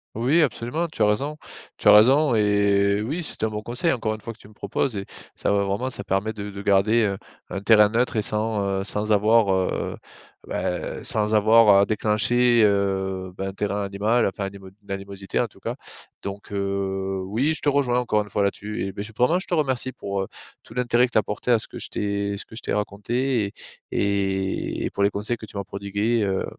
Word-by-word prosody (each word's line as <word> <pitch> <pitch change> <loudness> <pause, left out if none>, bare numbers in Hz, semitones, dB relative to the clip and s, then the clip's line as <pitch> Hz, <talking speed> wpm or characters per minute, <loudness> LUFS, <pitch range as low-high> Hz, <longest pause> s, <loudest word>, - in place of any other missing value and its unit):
Oui, 115 +2 -3
oui, 170 - +6
absolument, 140 +5 -1
tu 155 - -8
as 105 - +5
raison. 140 +9 -1 0.4
Tu - - -2
as - - +10
raison 125 +5 +6
et 100 -1 +3
oui 150 +11 -3
c'est - - -7
un 110 - +3
bon 105 0 -5
conseil 125 +9 -1
encore 115 -5 -1
une 110 - -8
fois, 115 - -6
que 115 - -14
tu 105 - -16
me 110 - -17
proposes 105 +5 -2
et 100 -1 -4 0.3
ça - - -1
va 100 0 +2
vraiment 100 +6 -1
ça 100 - -5
permet 100 +3 -1
de 105 -1 -6
de 100 0 -7
garder, 105 +3 +3
heu, 100 -1 -1 0.3
un 100 - -4
terrain 105 -1 +6
neutre 115 +3 0
et 110 - +2
sans, 105 0 -1 0.2
heu, - - -3
sans 105 +2 -1
avoir, 105 0 +4
heu, 95 -1 -1 0.5
bah, - - -3
sans 105 0 +1
avoir 110 -1 +6
à 100 - +5
déclencher, 115 +3 +2
heu, 95 -2 0
bah, 95 0 -4
un 95 - -5
terrain 100 +1 -2
animal, 105 +4 +1
enfin 100 +1 -4
animo 95 -1 -9
une 100 - -11
animosité 100 0 -4
en - - +1
tout - - -21
cas. - - -3 0.5
Donc 100 +1 -7
heu, 95 -1 -2
oui 120 +11 0
je - - -3
te 145 - +3
rejoins 135 -4 +2
encore 110 -4 +1
une 105 - -8
fois 100 0 0
là, 100 - +2
tu 105 0 -5
eh 95 - -4
ben 100 +1 -6
je 110 +1 -10
vraiment 155 +9 +3
je 185 - -8
te 175 - 0
remercie 130 -4 0
pour, 100 -1 -3
heu, 95 - -3 0.4
tout - - -15
l'intérêt 125 0 +3
que 125 - -17
t'as 110 - +4
apporté 105 +4 -5
à 120 - +6
ce 110 - -5
que - - -9
je - - -5
t'ai 100 0 -2
ce - - -4
que - - -13
je 115 - -6
t'ai - - -4
raconté 105 +2 -1 0.4
et 95 -1 -1
et - - -3
pour - - -3
les 100 - +5
conseils 105 +4 -3
que 110 - -10
tu 100 - -10
m'as 100 - -2
prodigués, 100 +4 -1
heu, 95 -1 0
105 Hz, 230 wpm, -24 LUFS, 100-115 Hz, 0.5 s, as